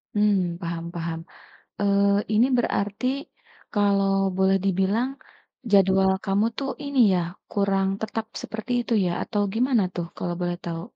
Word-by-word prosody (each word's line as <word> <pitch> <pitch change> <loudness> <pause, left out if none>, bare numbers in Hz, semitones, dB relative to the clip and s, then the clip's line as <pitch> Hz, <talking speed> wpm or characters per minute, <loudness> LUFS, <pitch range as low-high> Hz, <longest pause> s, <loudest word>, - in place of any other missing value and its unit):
Mmm 195 -5 +2
paham 170 -1 -4
paham, 165 -1 -3 0.6
eee, 200 0 +3
ini 230 +4 +5
berarti 205 0 -1 0.7
kalau 200 -1 +3 0.3
boleh 190 0 +3
dibilang 195 +6 +1 0.6
jadwal 190 -1 +5
kamu 200 +3 +2
tuh 275 -1 -2
ini 280 -1 -3 0.2
ya 180 - +2 0.3
kurang 195 -1 +1
tetap 220 0 -3 0.2
seperti 220 +2 -5
itu 235 - -4
ya 175 - 0
atau 210 - -2
gimana 245 -1 +2
tuh 175 -1 -3
kalau 175 -1 -3
boleh 175 0 -1
tahu? 165 -1 -4
200 Hz, 135 wpm, -25 LUFS, 185-215 Hz, 0.7 s, ini